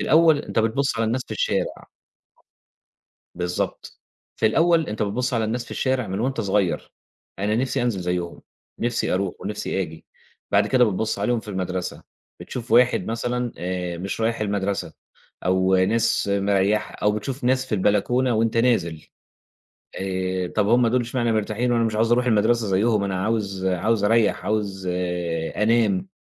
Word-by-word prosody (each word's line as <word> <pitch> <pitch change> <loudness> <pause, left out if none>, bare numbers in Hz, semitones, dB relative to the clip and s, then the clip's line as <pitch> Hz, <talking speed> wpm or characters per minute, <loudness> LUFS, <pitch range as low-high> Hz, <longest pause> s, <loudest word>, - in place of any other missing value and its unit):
الأول 160 -1 +5
أنت 145 - -4
بتبُصّ 115 +5 +1
على 115 - +2
الناس 125 +3 0
في - - -21
الشارع - - -2 1.5
بالضبط، 90 0 -3 0.4
في 110 - +2
الأول 165 +6 +3
أنت 105 +1 -2
بتبُصّ 125 +5 -1
على 115 -1 +1
الناس 120 +2 -2
في - - -16
الشارع 130 -3 0
من 95 +3 -3
وأنت 130 -1 -1
صغير، 100 -3 0 0.5
أنا 105 +2 0
نِفْسي 130 +1 0
أنزل 115 -6 0
زيهم، 90 -1 -3 0.4
نِفْسي 120 -5 0
أروح 95 -1 -1
ونِفْسي 100 -1 -2
آجي، 80 -1 -9 0.4
بعد 105 +1 +4
كده 125 +1 +4
بتبُصّ 110 +1 -1
عليهم 120 -2 0
في 110 - -14
المدرسة، 95 -2 -3 0.4
بتشوف 120 -2 -7
واحد 125 +1 +4
مثلًا 120 +1 -2
آآ 90 -1 -3
مش 95 +4 -4
رايح 115 0 0
المدرسة، 100 -2 -2 0.5
أو 95 +1 +3
ناس 110 +4 +2
مريّحة 100 +1 +1
أو 105 - +1
بتشوف 125 +5 -4
ناس 130 +1 +2
في 110 - -1
البلكونة 115 +6 +2
وأنت 115 +1 +1
نازل، 95 -10 +1 0.9
آآ، 95 -1 -2
طَب 105 +3 0
هُم 120 +1 +4
دول 125 +2 +2
إشمعنا 120 -1 -1
مرتاحين! 110 +3 0
وأنا 115 -1 +2
مش 110 -1 -1
عاوز 115 +2 +2
أروح 125 +1 +2
المدرسة 115 0 +2
زيهم 100 +2 +2
أنا 95 -1 -2
عاوز 100 -4 -1
عاوز 100 +4 +1
أريّح 115 0 +2
عاوز 100 -3 -2 0.7
أنام، 120 - +2
110 Hz, 155 wpm, -23 LUFS, 95-120 Hz, 1.5 s, الأول